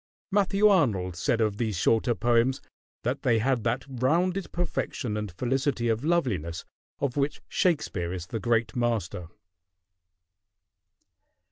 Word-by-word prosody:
Matthew 200 +1 +4
Arnold 110 - +2
said 115 +6 0
of 105 -2 +1
these 110 -5 -1
shorter 115 +5 +2
poems 120 +2 +2 0.4
that - - -1
they 115 -3 +3
had 120 0 +1
"that 120 +3 0
rounded 170 +9 0
perfection 145 -9 -2
and 105 -2 -3
felicity 125 - 0
of 115 +3 0
loveliness 105 - 0 0.3
of 140 -1 -2
which 140 +1 0
Shakespeare 140 - 0
is 90 -2 -5
the 110 +5 -4
great 115 +2 0
master." 115 -8 -1
120 Hz, 125 wpm, -27 LUFS, 105-140 Hz, 0.4 s, Matthew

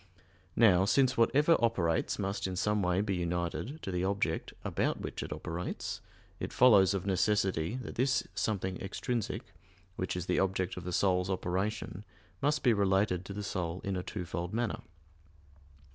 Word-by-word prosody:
Now, 95 -5 +5
since 130 +4 +3
whatever 145 +8 +4
operates 85 -8 +1
must 100 -1 -2
in 95 - -4
some 105 +2 +1
way 90 +1 +2
be 100 -1 -1
united 90 - -3
to 95 - -3
the 90 0 -1
object 95 -4 -1
about - - 0
which - - -5
it - - -6
operates, 85 +2 -4 0.4
it - - -4
follows 100 -6 +6
of 95 - -3
necessity 95 -2 +1
that - - -7
this 130 +1 +1
something 95 -4 -2
extrinsic, 115 +4 -3 0.4
which 90 - -2
is 90 - -3
the - - +1
object 95 -1 0
of 90 - -7
the 90 - -3
soul's 90 0 +2
operation, 95 +2 -2 0.4
must 145 +1 +1
be 125 -3 +5
related 95 -2 +2
to 100 - -6
the 105 +1 -4
soul 90 -3 -3
in 100 -1 -2
a 90 - -1
twofold 90 0 -4
manner. 120 -1 -1
95 Hz, 160 wpm, -31 LUFS, 90-110 Hz, 0.4 s, follows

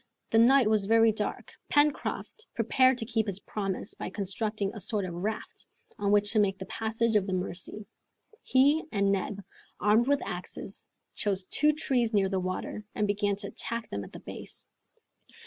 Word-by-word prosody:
The 225 - +5
night 255 +1 +6
was 215 -2 +2
very 225 0 +5
dark. 210 -1 -4 0.2
Pencroft 295 +8 0
prepared 255 +3 +4
to 225 - -3
keep 225 -1 0
his 200 -1 -2
promise 195 0 -3
by - - -5
constructing 200 +1 -2
a 215 - -7
sort 205 0 -1
of 175 - -5
raft, 205 +5 -4 0.3
on 200 0 +1
which 205 0 +3
to 215 - +4
make 195 -2 +2
the 190 - -6
passage 225 +1 -1
of 205 -2 +3
the 190 - -2
Mercy. 185 +3 -3 0.6
He 285 +5 +4
and 200 -2 +2
Neb, 200 +1 -2 0.4
armed 215 +4 +4
with 285 0 +2
axes, 180 +2 -7 0.3
chose 195 -2 -1
two 300 +9 +2
trees 245 -7 0
near 195 -2 +3
the 190 -1 0
water, 185 +3 -4
and 210 - +1
began 205 0 +1
to 200 0 -4
attack 230 -1 -3
them 100 0 -3
at - - -11
the - - -9
base. - - -7
210 Hz, 180 wpm, -29 LUFS, 195-230 Hz, 0.6 s, night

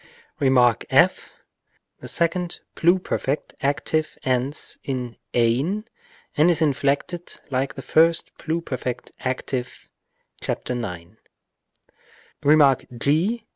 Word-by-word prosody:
Rem. 135 -2 +3 0.3
f. - - +3 0.7
The - - -9
second 175 +1 0
pluperfect 170 -5 +1
active 145 +2 0
ends 130 +1 -1
in 125 -3 -4 0.2
ew 130 - +1 0.5
and 155 +4 +5
is 170 - +2
inflected 145 +3 -1
like 130 +1 -1
the 135 - -7
first 165 +4 +3
pluperfect 145 -7 -3
active 130 0 -4 0.5
(§ 125 - -3
9). 90 -3 -6 1.2
Rem. 145 -2 +6 0.2
g. 180 - +1
140 Hz, 95 wpm, -23 LUFS, 130-165 Hz, 1.2 s, Rem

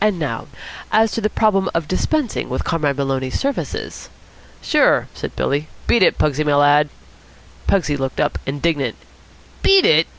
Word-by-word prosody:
And 210 -3 +2
now, 140 -8 -4 0.4
as 220 0 +3
to 225 - -3
the 215 - +1
problem 195 -4 +1
of 165 -2 -1
dispensing 255 - -1
with - - -2
Comrade 150 -5 -1
Maloney's 135 -2 -2
services?" 270 - -4 0.5
"Sure," - - +2
said - - -7
Billy. 145 +3 -1 0.2
"Beat 235 - +3
it, - - +4
Pugsy, 150 0 +1
my 145 -1 +2
lad." 145 +1 +4 0.8
Pugsy 155 -7 +1
looked 135 -2 -4
up, 150 - 0
indignant. 140 -3 -1 0.7
"Beat 390 -1 +5
it?" 160 +1 +4
155 Hz, 155 wpm, -19 LUFS, 145-200 Hz, 0.8 s, Beat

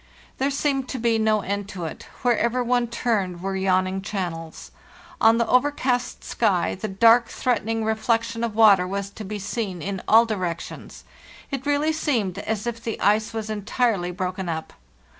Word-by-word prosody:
"There 270 +2 +2
seemed 275 -2 -1
to - - -3
be 230 -2 +1
no 215 -1 +2
end 200 +1 -3
to 180 -4 -5
it; 160 - -7 0.2
wherever 240 0 +2
one 245 0 +1
turned 215 -7 -1
were 195 +2 -3
yawning 190 0 +1
channels. 175 -5 -5 0.5
On 225 +1 +6
the 235 - +2
overcast 255 -1 +1
sky 200 -6 +1
the 205 +3 -4
dark, 230 +4 +5
threatening 225 -2 -1
reflection 230 +1 0
of 230 -3 -2
water 200 -5 +6
was 200 +1 -4
to 215 - -8
be 210 +1 -5
seen 200 -2 -4
in 190 +3 -4
all 225 +2 +7
directions. 185 -7 -5 0.5
It 275 0 -4
really 290 +2 +2
seemed 225 - -1
as 215 +1 -3
if 235 -1 -4
the 225 -2 -4
ice 215 +2 +2
was 220 -1 -4
entirely 210 -2 0
broken 185 0 -3
up. 160 -1 -4
220 Hz, 165 wpm, -24 LUFS, 190-235 Hz, 0.5 s, all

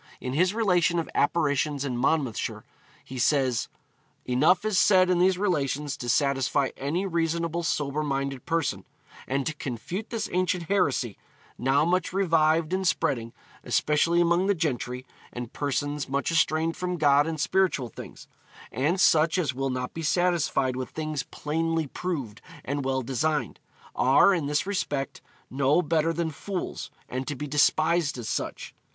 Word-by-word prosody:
In 125 - -4
his 180 +7 +2
relation 180 -6 +2
of 165 - -1
apparitions 145 -2 +1
in 130 -3 -2
Monmouthshire, 130 -1 -1 0.4
he 130 -1 -8
says: 130 -2 +2 0.6
'Enough 150 +11 +3
is 210 -4 +2
said 185 -2 +5
in 175 - +2
these 185 0 +3
relations 150 -7 -1
to 120 - -5
satisfy 140 +1 +1
any 160 +8 -2
reasonable 170 -1 -1
sober 150 -3 -1
minded 140 -3 -3
person, 165 -2 -1 0.4
and 135 +1 -1
to 155 - -1
confute 150 - -5
this 225 -2 -3
ancient 180 -1 0
heresy, 140 - 0 0.4
now 135 +4 +2
much 180 +1 0
revived 165 -3 +2
and 190 0 0
spreading, 115 -9 0 0.3
especially 165 +3 +2
among 175 +2 +3
the 200 - +3
gentry, 130 -5 -2 0.3
and 120 0 -7
persons 145 0 -2
much 140 +4 -1
estranged 160 0 +1
from 180 -1 -2
God 145 -1 +4
and 160 -1 -3
spiritual 155 -6 +1
things; - - -11 0.4
and 155 +8 0
such 160 0 +4
as 160 -7 0
will 135 +1 -2
not 125 -1 -3
be 165 - -5
satisfied 160 -5 +1
with 130 0 -4
things 155 -3 -3
plainly 160 +4 -2
proved 140 - -5 0.2
and 140 +1 -2
well 130 0 -1
designed; 135 +1 -1 0.4
are, 135 +9 +5
in 165 -6 -1
this 150 +3 0
respect, 145 -8 -3 0.3
no 140 +4 +2
better 160 +1 +1
than 165 0 -2
fools, 185 +5 -5 0.2
and 130 +1 -4
to 145 - -3
be 145 - -5
despised 155 +2 +2
as 120 - -6
such.... - - -4
150 Hz, 155 wpm, -26 LUFS, 135-170 Hz, 0.6 s, said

